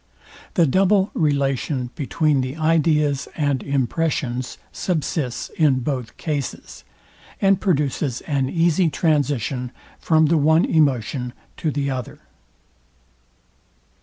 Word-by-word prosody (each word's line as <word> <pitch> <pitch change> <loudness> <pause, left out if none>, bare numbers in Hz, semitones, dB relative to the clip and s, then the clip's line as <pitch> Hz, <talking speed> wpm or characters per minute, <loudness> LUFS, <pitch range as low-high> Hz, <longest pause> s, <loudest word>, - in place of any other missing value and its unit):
The 175 -5 +5
double 190 +6 +3
relation 140 -3 0
between 150 -2 +1
the 130 +2 -4
ideas 155 -3 +2
and 145 -5 0
impressions 135 -2 -1
subsists 155 -7 -2
in 140 -5 +3
both 125 -3 -4
cases, 145 -5 -5 0.6
and 195 -1 +3
produces 145 - 0
an 135 -4 -1
easy 170 +1 +2
transition 140 - 0 0.3
from 160 -1 +3
the 160 +2 +3
one 160 +3 +4
emotion 130 -4 +1 0.2
to 160 - -1
the 140 -1 -1
other. 130 -2 -5
145 Hz, 105 wpm, -22 LUFS, 130-160 Hz, 0.6 s, The